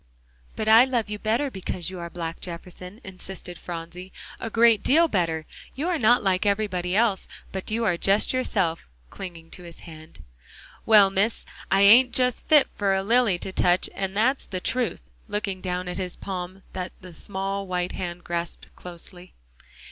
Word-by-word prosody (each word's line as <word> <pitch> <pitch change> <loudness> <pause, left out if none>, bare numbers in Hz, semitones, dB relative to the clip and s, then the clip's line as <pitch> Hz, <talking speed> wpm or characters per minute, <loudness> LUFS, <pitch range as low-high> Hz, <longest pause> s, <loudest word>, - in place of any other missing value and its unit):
"But 215 - -3
I 225 +2 +8
love 240 -5 -1
you 210 - -4
better 235 +7 0
because 185 -2 -5
you 185 - -7
are 170 0 -6
black, 165 -1 -5
Jefferson," 180 +3 -9
insisted 185 -2 -9
Phronsie, 175 +2 -8 0.3
"a 225 - -4
great 230 -1 +4
deal 330 +5 +4
better. 165 - -1 0.3
You 300 +6 -2
are 345 -3 0
not 240 +1 +4
like 185 -1 +2
everybody 195 -3 0
else, 215 -3 +2 0.2
but 190 -1 -5
you 230 +2 0
are 175 -5 +2
just 195 +7 +2
yourself," 195 -10 0 0.3
clinging 170 -3 -9
to - - -10
his 170 -1 -12
hand. 155 - -13 0.6
"Well, 205 -3 +7
Miss, 205 +4 0 0.2
I 195 - +3
ain't 235 +5 +7
just 250 -1 +1
fit 300 -3 +6
for 195 -1 +1
a 190 - 0
lily 230 -3 +3
to 190 - -6
touch 180 0 +2
and 195 0 -3
that's 260 +6 +1
the 185 - -4
truth," 245 +5 -1 0.2
looking 200 -3 -3
down 180 -1 -3
at 180 - -4
his 180 -2 -4
palm 185 0 -6
that 185 -1 -5
the 180 -2 -11
small 195 +3 -4
white 180 -1 -2
hand 175 -1 -5
grasped 170 0 -5
closely. 180 +1 -10
190 Hz, 175 wpm, -25 LUFS, 180-220 Hz, 0.6 s, I